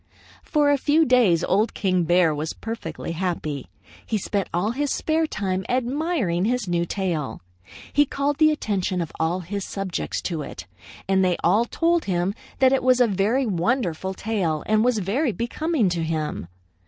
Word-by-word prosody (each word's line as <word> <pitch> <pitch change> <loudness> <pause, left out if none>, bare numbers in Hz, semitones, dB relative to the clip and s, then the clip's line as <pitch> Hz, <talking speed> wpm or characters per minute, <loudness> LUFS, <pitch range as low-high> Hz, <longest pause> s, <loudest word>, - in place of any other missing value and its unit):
"For 295 -2 +2
a 285 - +2
few 305 +4 +3
days 230 - +4
Old 210 +4 +1
King 185 -4 +1
Bear 175 -1 +4
was 150 +2 -3
perfectly 225 -9 -6
happy. 165 -5 -3 0.4
He 220 - -1
spent 200 -1 -2
all 180 +6 0
his 285 +4 -1
spare 320 0 +1
time 190 -7 -2
admiring 250 - 0
his 245 -2 0
new 170 -1 0
tail. 165 - -2 0.5
He 290 -1 +4
called 280 +1 -1
the 310 -1 +6
attention 195 -11 -1
of 165 -3 -3
all 170 +3 0
his 195 +3 -4
subjects 195 -3 -3
to 165 -4 -2
it, 145 - -8 0.4
and 190 0 +3
they 180 -2 +2
all 205 +7 +4
told 335 +6 +1
him 180 0 0 0.2
that 265 0 +4
it 270 - +2
was 255 0 +4
a 245 - +6
very 220 +6 +1
wonderful 190 -2 -1
tail 185 -9 -1
and 215 0 +3
was 245 -1 +2
very 225 - 0
becoming 240 - 0
to 170 -1 -2
him. 155 - -3
200 Hz, 170 wpm, -24 LUFS, 175-255 Hz, 0.5 s, the